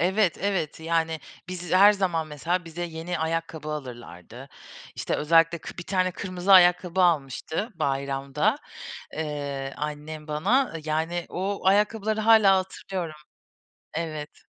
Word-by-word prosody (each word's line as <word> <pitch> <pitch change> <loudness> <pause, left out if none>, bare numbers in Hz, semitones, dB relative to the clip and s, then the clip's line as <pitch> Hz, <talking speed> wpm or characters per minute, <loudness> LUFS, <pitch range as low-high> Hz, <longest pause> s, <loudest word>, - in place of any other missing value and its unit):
Evet, 190 +1 +2
evet. 185 -7 -1
Yani, 165 -1 0 0.3
biz 180 -1 -6
her 200 +3 +8
zaman 175 -5 -1
mesela, 165 +4 -2
bize 165 +1 -6
yeni 165 +1 -4
ayakkabı 160 -1 -3
alırlardı. 125 - -8 0.5
İşte - - -2
özellikle 165 +2 +3
kı 165 - -10
bir - - -4
tane 185 0 0
kırmızı 185 +1 -1
ayakkabı 180 0 +6
almıştı, 160 - 0
bayramda, 140 - 0 0.6
eee, 145 -3 -4
annem 150 +1 -5
bana. 200 - +1
Yani 160 +3 -1
o 195 +2 -3
ayakkabıları 210 +2 +2
hâlâ 215 -3 +6
hatırlıyorum. 185 -3 -4 0.8
Evet. 155 -2 -5
165 Hz, 120 wpm, -26 LUFS, 150-185 Hz, 0.8 s, her